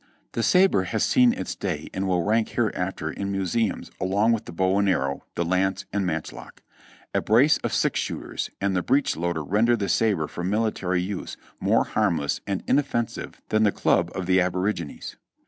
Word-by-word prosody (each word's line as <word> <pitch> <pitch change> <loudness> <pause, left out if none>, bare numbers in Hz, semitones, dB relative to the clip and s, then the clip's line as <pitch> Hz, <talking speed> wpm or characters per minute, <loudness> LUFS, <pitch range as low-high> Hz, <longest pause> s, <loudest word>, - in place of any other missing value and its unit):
The - - -2
sabre 180 - +4
has 110 +3 -1
seen 250 -1 +5
its 255 - -4
day 80 -6 -4
and 95 0 -2
will 90 -2 +1
rank 110 +3 +1
hereafter - - -2
in 100 0 -4
museums 95 +3 -1
along 100 +5 +2
with 115 -2 0
the - - -8
bow 95 +3 +1
and 100 -1 +2
arrow, 70 -6 0
the 85 - 0
lance 95 +2 0
and 100 -2 0
matchlock. 80 -2 -6 0.5
A - - +1
brace 125 +8 +4
of - - -3
six - - +1
shooters - - -4
and 100 -1 0
the 90 - +2
breechloader 85 - 0
render 110 +9 +2
the 100 -3 -2
sabre 100 -6 +2
for 85 - -6
military 95 -3 0
use 95 0 -5 0.2
more - - +3
harmless 85 -9 0
and 100 -2 -2
inoffensive 130 -5 -1
than 110 - +2
the 105 -2 +4
club 85 -3 +1
of 95 - -3
the 95 +1 +3
abo 90 0 0
rigines. 85 -6 -8
95 Hz, 180 wpm, -25 LUFS, 90-110 Hz, 0.5 s, seen